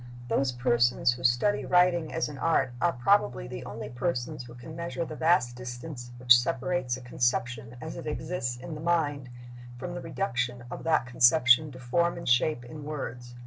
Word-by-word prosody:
Those 125 +3 +1
persons 120 0 +2
who 125 +1 -10
study 125 +12 +2
writing 180 -3 +3
as 165 - -1
an 145 -3 -8
art 135 -5 +1
are 175 - +3
probably 120 - +2
the - - -7
only - - -6
persons 125 +1 -3
who 120 0 -12
can 125 +6 -10
measure 170 0 -3
the 155 - -7
vast 150 -7 +2
distance 125 +1 -7
which 125 0 +7
separates 125 +1 -1
a - - -11
conception 120 -1 -1
as 160 +4 -7
it - - -7
exists 150 -5 -3
in 130 +6 -8
the 150 - -7
mind 150 -6 0 0.5
from 175 +7 -6
the 175 - -5
reduction 125 -9 -2
of - - -6
that 160 -6 +2
conception 125 +3 +5
to 130 - -11
form 170 +9 0
and 170 - -7
shape 125 +1 +2
in 150 +4 -9
words. 125 -5 -6
130 Hz, 185 wpm, -28 LUFS, 120-160 Hz, 0.5 s, which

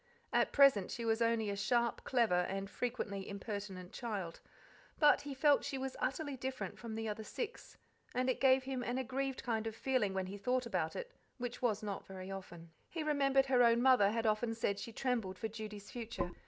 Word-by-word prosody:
At - - +3
present 275 -9 +6
she 235 - -4
was 225 +1 +1
only 230 -2 +2
a - - -2
sharp, 235 +4 +1
clever, 230 -8 +3
and 195 0 -3
frequently 205 -3 -3
impertinent 200 -2 -5
child; 200 -8 -4 0.6
but 295 -2 +6
he 285 -1 -6
felt 290 +1 +4
she 270 - -3
was 265 0 -4
utterly 285 +1 -1
different 260 0 -4
from 230 -2 -6
the 225 0 -3
other 215 +1 -3
six, 460 - -6 0.4
and 255 +1 +1
it 255 - +1
gave 265 -1 +5
him 260 -1 -3
an 245 +1 -2
aggrieved 265 +1 -2
kind 225 -3 -1
of 220 - -4
feeling 235 -7 +1
when 190 -1 0
he 200 +2 -7
thought 250 +4 +1
about 180 -8 -1
it, - - -5 0.3
which 245 -1 -5
was 220 -4 +1
not 200 -2 -4
very 190 0 -7
often. 175 -4 -8 0.2
He 330 -3 -3
remembered 275 -3 +3
her 260 -2 +4
own 235 -1 +6
mother 250 -5 +6
had 230 +2 -1
often 225 +1 +1
said 200 -3 0
she 230 - -6
trembled 225 -6 -1
for 220 - -2
Judy's 210 -1 -8
future. 230 -7 -4
230 Hz, 200 wpm, -35 LUFS, 200-260 Hz, 0.6 s, present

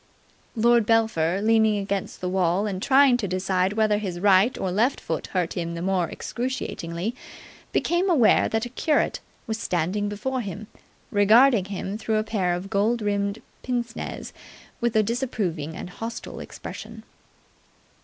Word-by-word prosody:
Lord 235 -1 +4
Belpher, 200 -6 +2
leaning 220 -1 +4
against 200 -1 -3
the 180 - -2
wall 185 +1 +1
and 190 -3 -3
trying 270 0 +5
to 215 -5 -2
decide 185 +1 0
whether 215 -1 +2
his 185 -4 -4
right 200 +4 +4
or 185 - -2
left 230 +9 +1
foot 160 -2 -4
hurt 180 -3 -1
him 170 -1 -3
the 170 - -5
more 185 -3 +1
excruciatingly, 225 -6 -4 0.6
became 350 +3 +1
aware 265 -11 +4
that 225 +1 -1
a - - -6
curate 295 +4 0 0.3
was 220 -2 -3
standing 185 +3 -1
before 255 +5 -2
him, 205 0 -6 0.5
regarding 215 +1 +5
him 200 +1 -5
through 220 -1 0
a 215 - +1
pair 190 -5 0
of 185 +3 -7
gold 215 +3 +1
rimmed 200 +1 -1 0.2
pince 240 -2 -3
nez - - -6 0.5
with 235 -1 0
a 215 - +5
disapproving 200 - -2
and 180 - -7
hostile 225 +4 -6
expression. - - -9
205 Hz, 155 wpm, -25 LUFS, 185-230 Hz, 0.6 s, trying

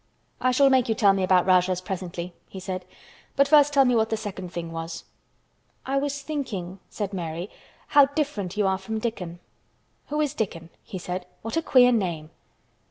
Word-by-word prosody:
"I 255 - +3
shall 270 +2 +4
make 255 -3 +3
you 220 - +2
tell 200 -2 +5
me 195 - -1
about 185 -1 +4
Rajahs 185 -1 +3
presently," 180 -2 -5 0.2
he 190 - -8
said, 185 0 -5 0.5
"but 280 0 +4
first 295 0 +6
tell 275 -2 +5
me 250 - +3
what 220 -1 +2
the 220 - 0
second 195 -4 -6
thing 170 -1 -5
was." 165 0 -6 0.8
"I 270 +1 0
was 285 0 -3
thinking," 200 - -4
said 205 -2 -4
Mary, 170 +1 -4 0.4
"how 285 -1 +7
different 275 - -3
you 210 - +2
are 190 0 +1
from 220 +3 -4
Dickon." 200 -7 -4 0.7
"Who 300 +1 -2
is 300 -2 +1
Dickon?" 170 - -4
he 195 - -7
said. 180 0 -5 0.2
"What 225 - -4
a 330 - +2
queer 250 -5 +5
name!" 170 -9 -1
200 Hz, 185 wpm, -25 LUFS, 180-260 Hz, 0.8 s, how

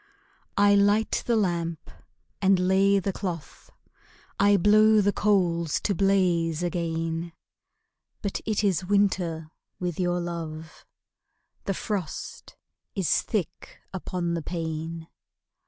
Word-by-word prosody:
I 205 0 +5
light 205 +2 +3
the 235 - +3
lamp 170 -6 -1 0.5
and 195 -1 +4
lay 190 +2 +3
the 195 0 -1
cloth, 175 -6 -6 0.7
I 200 0 +5
blow 215 +3 +5
the 205 0 +2
coals 175 -6 +1
to 205 - 0
blaze 175 -4 +1
again; 165 -1 -2 0.9
But 200 - -2
it 215 -1 0
is 190 -3 +1
winter 180 -5 0 0.3
with 180 -2 -3
your 175 -1 +1
love, 165 -2 -6 0.8
The 195 - -1
frost 195 -6 -5 0.4
is 190 -5 +2
thick 200 -8 -4 0.2
upon 180 -2 -3
the 170 - -2
pane. 160 0 -5
180 Hz, 110 wpm, -26 LUFS, 165-200 Hz, 0.9 s, I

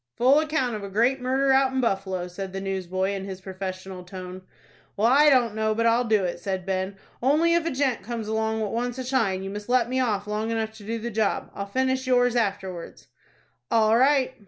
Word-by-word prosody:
"Full 265 +4 +5
account 300 -7 0
of 210 - -6
a 200 - -5
great 240 +6 +2
murder 265 +2 +2
out 265 0 +4
in 265 - -1
Buffalo," 195 -6 -1
said 190 +1 -7
the 195 - -3
newsboy, 190 0 -2
in 195 -1 -4
his 190 -1 -6
professional 185 -1 -6
tone. 185 0 -8 0.6
"Well, 210 - +2
I 285 +5 +6
don't 245 -5 +3
know 220 0 0
but 230 +1 0
I'll 230 +2 +3
do 215 -3 +2
it," 175 -1 -3
said 190 -2 -3
Ben. 190 0 -2 0.2
"Only 305 +7 +3
if 340 -1 +1
a - - +2
gent 265 -4 0
comes 225 +1 -5
along 220 0 -1
what 210 -2 -2
wants 245 +1 -2
a 260 - -3
shine, 220 -8 0
you 195 - -5
must 205 +2 -7
let 250 -2 +3
me 260 +1 0
off 210 -6 0
long 210 +1 -2
enough 225 -1 -1
to 210 - -12
do 225 +3 -3
the 235 +1 -5
job. 215 -1 -1
I'll 200 - -5
finish 260 +3 0
yours 245 -1 +3
afterwards." 190 -6 -3 0.6
"All 220 -1 +4
right." 260 +1 +3
220 Hz, 220 wpm, -25 LUFS, 195-255 Hz, 0.6 s, I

